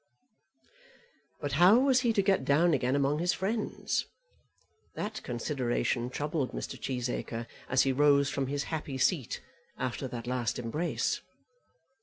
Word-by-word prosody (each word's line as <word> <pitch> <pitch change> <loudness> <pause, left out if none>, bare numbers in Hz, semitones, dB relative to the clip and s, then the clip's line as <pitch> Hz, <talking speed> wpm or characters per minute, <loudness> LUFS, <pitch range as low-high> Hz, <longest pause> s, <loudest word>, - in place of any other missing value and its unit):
But 145 - -2
how 190 +6 +8
was 260 0 +4
he 240 -2 +2
to 200 - +2
get 195 -7 +2
down 155 +5 +4
again 130 -1 +1
among 140 +1 +1
his 175 +1 +2
friends? 210 +3 -2 0.9
That 215 +1 -4
consideration 120 -1 -1
troubled 145 0 -2
Mr. - - -4
Cheesacre 125 -2 -3 0.2
as 130 0 +4
he 135 - +2
rose 140 +1 +4
from 135 -1 -1
his 140 +1 -1
happy 150 -4 -3
seat 135 -1 0 0.3
after 130 +1 -3
that 120 -2 -6
last 120 -3 -1
embrace. 135 +9 -1
140 Hz, 135 wpm, -30 LUFS, 125-175 Hz, 0.9 s, how